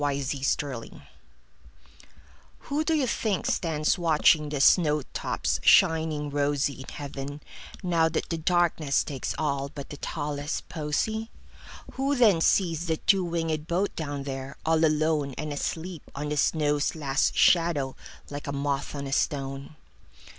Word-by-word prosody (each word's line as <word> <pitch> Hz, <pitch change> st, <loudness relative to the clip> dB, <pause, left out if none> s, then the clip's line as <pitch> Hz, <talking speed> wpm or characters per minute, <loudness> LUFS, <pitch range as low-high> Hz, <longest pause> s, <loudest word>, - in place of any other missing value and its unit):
Everlasting 140 Hz, -1 st, -1 dB
Flowers 135 Hz, -3 st, -1 dB, 1.7 s
WHO 295 Hz, +2 st, -2 dB
do 325 Hz, -, +2 dB
you 290 Hz, -4 st, +2 dB
think 220 Hz, -5 st, -1 dB
stands 155 Hz, 0 st, +1 dB
watchingThe 155 Hz, -3 st, +3 dB
snow 150 Hz, 0 st, +4 dB
tops 70 Hz, -, -1 dB
shining 160 Hz, -, +4 dB
rosyIn 140 Hz, -2 st, -1 dB
heaven, 145 Hz, 0 st, -6 dB, 0.4 s
now 165 Hz, -2 st, +2 dB
that 165 Hz, -, -2 dB
the 165 Hz, -, -2 dB
darknessTakes 160 Hz, -5 st, 0 dB
all 140 Hz, -2 st, -1 dB
but 140 Hz, 0 st, -9 dB
the 145 Hz, -, -7 dB
tallest 145 Hz, +1 st, -4 dB
posy? 215 Hz, +9 st, -2 dB, 0.6 s
Who 275 Hz, +2 st, 0 dB
then 215 Hz, -10 st, +4 dB
sees 170 Hz, -2 st, +2 dB
the 160 Hz, -1 st, 0 dB
two 195 Hz, +2 st, +3 dB
wingedBoat 170 Hz, +2 st, -1 dB
down 145 Hz, -3 st, -4 dB
there, 135 Hz, 0 st, -6 dB
all 160 Hz, 0 st, +3 dB
aloneAnd 155 Hz, -2 st, +1 dB
asleep 165 Hz, +3 st, -4 dB
on 145 Hz, +1 st, -3 dB
the 150 Hz, -, -2 dB
snow's 150 Hz, 0 st, +1 dB
last 145 Hz, -2 st, 0 dB
shadow, 165 Hz, -6 st, +3 dB, 0.4 s
Like 145 Hz, 0 st, -6 dB
a -, -, -2 dB
moth 140 Hz, 0 st, -2 dB
on 140 Hz, 0 st, -4 dB
a 135 Hz, -, -4 dB
stone? 135 Hz, +1 st, -2 dB
150 Hz, 130 wpm, -27 LUFS, 140-165 Hz, 1.7 s, snow